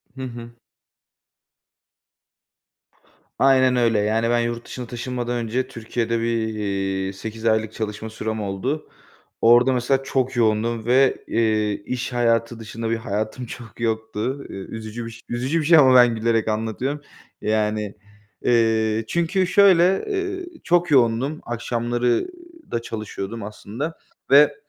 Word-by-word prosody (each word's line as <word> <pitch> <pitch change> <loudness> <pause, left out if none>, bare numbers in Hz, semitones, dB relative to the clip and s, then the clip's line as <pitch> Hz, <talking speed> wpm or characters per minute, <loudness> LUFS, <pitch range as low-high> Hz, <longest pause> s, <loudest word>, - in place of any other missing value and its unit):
Hı 135 - -8
hı. 120 -2 -7 2.9
Aynen 130 -1 +5
öyle. 115 -3 +3
Yani 110 +2 +1
ben 120 0 +3
yurt 120 0 -2
dışına 125 - -7
taşınmadan 120 +1 -3
önce 120 +2 -1
Türkiye'de 115 -1 -2
bir, - - -2 0.3
iii, 95 -2 -2
8 110 +3 -7
aylık 110 -1 +1
çalışma 110 0 -4
sürem 110 0 -4
oldu. 105 +10 -3 0.5
Orada 120 +3 +6
mesela 130 +2 +1
çok 130 -1 -1
yoğundum 115 0 +1
ve, 130 +2 +3
eee, 110 -2 +1
iş 125 0 -3
hayatı 115 -1 +1
dışında 115 +1 -5
bir 115 - +1
hayatım 110 +3 -3
çok 120 -1 -10
yoktu. 110 +4 -2
Iıı, 95 - -7
üzücü 110 +1 -6
biş 115 +1 -10
üzücü 130 +7 0
bir 155 - -2
şey 165 +1 +7
ama 130 -4 +7
ben 120 -2 +6
gülerek 115 0 +1
anlatıyorum. 110 +6 -2 0.4
Yani, 105 -1 -1 0.5
eee, 115 -2 +2
çünkü 170 - +1
şöyle, 190 -1 +5
ııı, 380 -2 -2 0.2
çok 175 -1 +2
yoğundum. 130 +3 +3
Akşamları 120 - -1 0.4
da 115 - -1
çalışıyordum 110 -1 -6
aslında 110 +9 -6 0.3
ve, 145 +1 +7
115 Hz, 130 wpm, -22 LUFS, 110-130 Hz, 2.9 s, şey